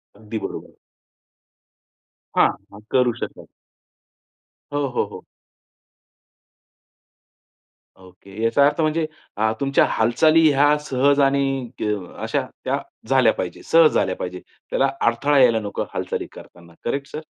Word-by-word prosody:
अगदी 110 +1 -7
बरोबर. - - -7 1.6
हां. 100 +1 +1
करू 125 -2 +3
शकतात. - - -6 1.3
हो, 145 -1 0
हो, 125 - -1
हो. - - -10 2.8
ओके. 95 +3 -12
याचा 140 +5 +4
अर्थ 150 +3 +1
अ, - - +3
म्हणजे 155 +1 +1 0.3
अ, 110 +1 +2
तुमच्या 140 0 +3
हालचाली 155 +8 +4
ह्या 145 +2 +4
सहज 140 +2 +2
आणि 135 -2 +1
अ, - - -1 0.4
अशा - - -1 0.2
त्या - - -1 0.3
झाल्या 130 -4 +4
पाहिजेत. 90 -1 -5
सहज 165 -2 +5
झाल्या 95 - +1
पाहिजेत. 90 0 -6 0.3
त्याला 135 - +2 0.2
अडथळा 140 +5 +2
यायला 120 -3 +5
नको 105 -2 -4
हालचाली - - -3
करतांना, 85 -1 -15
करेक्ट 140 +3 -2
सर? 155 +1 -7
130 Hz, 120 wpm, -22 LUFS, 110-145 Hz, 2.8 s, सहज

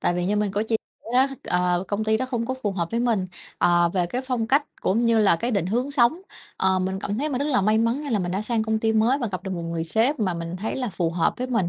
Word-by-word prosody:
tại 175 - +1
vì 180 0 -1
như 210 +1 +1
mình 210 -1 +1
có 205 +2 0
chia 225 0 0 0.3
sẻ - - -21
đó, 260 +2 +5 0.2
ờ, 180 0 +1
công 210 +1 -1
ty 220 0 +2
đó 260 - -2
không 235 -3 -2
có 260 - -1
phù 205 -2 0
hợp 170 -3 -2
với 230 - 0
mình, 225 -6 +1 0.3
ờ, 175 0 +4
về 175 -1 0
cái 250 +8 -3
phong 250 -4 -1
cách 280 +4 +3 0.2
cũng 225 +5 +1
như 230 -1 +4
là 195 -6 +4
cái 235 +8 -2
định 200 -7 0
hướng 245 +8 -1
sống. 280 +5 +3 0.4
Ờ, 190 0 +2
mình 190 +1 -2
cảm 205 +3 -3
thấy 300 +2 0
mình 255 -3 -2
rất 280 - -1
là 275 -7 +2
may 215 +3 +3
mắn, 230 +4 +1
nghĩa 290 -3 -5
là 215 - +2
mình 175 -1 -2
đã 195 +3 -1
sang 225 0 0
công 220 0 0
ty 220 0 +1
mới 230 +5 +3
và 240 -5 -2
gặp 185 - -4
được 190 - -5
một 175 -2 -3
người 165 0 -3
sếp 230 - +1
mà 185 -4 0
mình 170 +1 -5
thấy 215 +4 -3
là 250 -5 -2
phù 170 -2 -1
hợp 165 -1 +1
với 255 - -3
mình, 225 -9 0
220 Hz, 315 wpm, -24 LUFS, 185-240 Hz, 0.4 s, đó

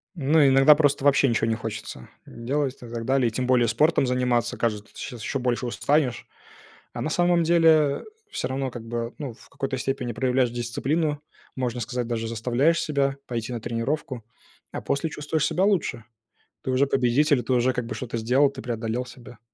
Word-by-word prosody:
Ну, 150 0 +4
иногда 135 +3 +7
просто 145 -2 +1
вообще 140 -1 +5
ничего 115 -1 +1
не 115 - +1
хочется 110 - -7 0.2
делать 135 +3 -2
и - - -30
так 115 -1 -5
далее. 130 -2 +2
И - - -1
тем 125 +2 -2
более 125 -2 +4
спортом 135 +4 +2
заниматься. 125 -2 0
Кажется, 105 -3 -2
сейчас 120 -3 -7
ещё 135 - -2
больше 125 0 -1
устанешь. 135 +1 0 0.7
А - - -6
на 155 - -2
самом 175 +1 +3
деле 160 -4 +4 0.3
всё - - -3
равно, 135 0 -2
как 120 -1 -8
бы, 115 0 -3
ну, 140 -5 -5
в - - -19
какой-то 135 -1 -4
степени 130 -2 -2
проявляешь 125 +2 +1
дисциплину, 145 +6 -1 0.4
можно 125 -1 -2
сказать, 125 +1 -3
даже 115 -1 -3
заставляешь 125 +8 +1
себя 140 -2 0
пойти 120 0 -4
на 120 - -4
тренировку, 120 +3 -3 0.5
а - - -5
после 140 +3 -1
чувствуешь 150 +1 -1
себя 185 +3 +1
лучше. 155 - 0 0.6
Ты 130 - -2
уже 130 +2 +3
победитель, 135 +2 +2
ты 130 - -1
уже 125 +1 +3
как 125 - -3
бы 115 - -5
что-то 120 -2 -4
сделал, 130 +5 +3
ты 135 -1 -9
преодолел 120 +1 -3
себя. 120 -2 -13
130 Hz, 185 wpm, -25 LUFS, 120-145 Hz, 0.7 s, иногда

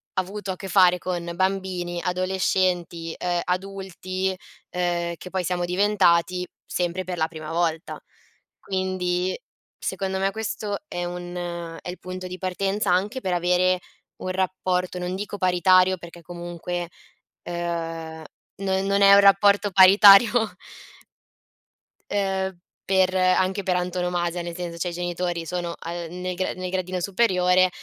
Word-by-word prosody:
avuto 195 +2 -3
a - - -4
che 195 - -8
fare 180 -1 +5
con 175 -1 -4
bambini, 185 -2 -1
adolescenti, 180 -2 0
ehm, 175 -1 -1
adulti, 190 0 -3 0.3
ehm, 175 -1 -1
che 180 - -9
poi 185 -1 -2
siamo 175 +1 -1
diventati 180 -2 +2 0.2
sempre 180 +1 -2
per 180 0 -5
la 160 -1 +1
prima 155 -2 -8
volta. 165 -1 -1 0.6
Quindi, 185 -1 -1 0.4
secondo 190 0 -3
me, 195 +1 +1
questo 210 -1 -3
è 175 0 -4
un 175 0 -6 0.5
è - - -7
il 180 - -7
punto 185 0 -6
di 180 0 -7
partenza 195 +2 -1
anche 195 +8 +1
per 185 - -1
avere 180 +1 +2 0.4
un 185 - -5
rapporto, 185 -1 -1
non 180 +1 -3
dico 205 +1 -5
paritario 185 0 +4
perché 170 0 -12
comunque, 175 0 -5 0.5
ehm, 165 -2 -4 0.4
non 190 0 0
non 200 0 +2
è 200 0 +8
un 200 - +9
rapporto 200 +1 +5
paritario 200 +4 +7 1.6
ehm, 190 -2 -1 0.3
per 190 -1 +3
anche 185 +1 +2
per 185 -1 +1
antonomasia, 180 -1 -1
nel 170 0 -6
senso 175 -1 -5
cioè 180 - -2
i - - -6
genitori 175 -1 -3
sono 175 0 -3
a 165 - -7
ehm, 175 +1 -6
nel 185 0 -3
gra 185 +1 -2
nel 185 0 -5
gradino 185 0 -2
superiore, 185 -2 +3
180 Hz, 140 wpm, -24 LUFS, 175-190 Hz, 1.6 s, un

